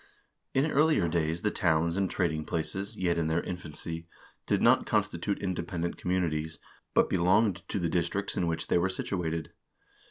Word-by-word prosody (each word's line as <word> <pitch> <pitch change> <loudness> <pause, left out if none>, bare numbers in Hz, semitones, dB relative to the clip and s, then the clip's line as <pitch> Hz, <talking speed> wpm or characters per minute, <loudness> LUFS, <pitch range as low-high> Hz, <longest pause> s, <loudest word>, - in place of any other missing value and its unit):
In 145 +4 +3
earlier 150 - +4
days 80 0 -1
the 105 - +2
towns 85 -1 +2
and 95 -1 +1
trading 80 -5 0
places, 95 +7 -3
yet 85 -4 +1
in 80 - 0
their 80 +2 +1
infancy, 85 -1 -6 0.4
did - - +2
not - - +4
constitute 100 - 0
independent 85 -2 -3
communities, 80 -3 -1 0.4
but - - +5
belonged 95 +2 +3
to - - -1
the 85 -3 0
districts 85 +4 -1
in 85 - 0
which 80 -1 -1
they - - +2
were 90 +2 +1
situated. 85 -3 -3
85 Hz, 160 wpm, -29 LUFS, 80-95 Hz, 0.4 s, but